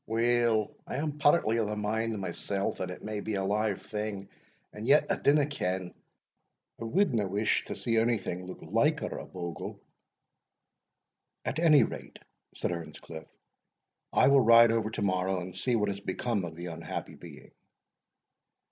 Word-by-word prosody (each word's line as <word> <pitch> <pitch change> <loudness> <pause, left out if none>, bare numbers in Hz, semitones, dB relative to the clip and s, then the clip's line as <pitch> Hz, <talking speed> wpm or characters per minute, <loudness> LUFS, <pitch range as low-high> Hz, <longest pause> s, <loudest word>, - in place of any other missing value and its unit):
"Weel, 115 -1 +2
I - - -4
am 150 +1 -3
partly 145 -6 +4
of 110 -2 +1
the 105 - -2
mind 110 +1 -1
mysell 95 +2 -2
that 90 - -4
it 90 - -8
may 105 0 -3
be 105 0 -3
a 95 - -1
live 105 +1 0
thing 105 -2 -5 0.4
and 105 +2 -6
yet 145 +3 +6
I - - +3
dinna 145 0 +4
ken, 95 -10 -3 0.9
I - - -3
wadna 115 - +1
wish 100 +3 +1
to - - -5
see 115 -1 +1
ony 115 +1 +2
thing 90 -2 -5
look 95 - -9
liker - - +1
a - - -9
bogle." 85 -2 -6 1.7
"At - - -2
any 160 -3 +6
rate," - - -6 0.4
said - - -2
Earnscliff, 80 -1 -7 0.8
"I 130 - +4
will 140 0 +6
ride 115 0 +7
over 115 -1 0
to 110 -1 -3
morrow 95 -1 0
and 90 +1 -7
see 120 +6 +1
what 105 -2 +1
has 100 0 -4
become 100 +1 -2
of 80 -1 -8
the 85 +1 -7
unhappy 85 -1 -6
being." - - -13
105 Hz, 165 wpm, -29 LUFS, 95-115 Hz, 1.7 s, ride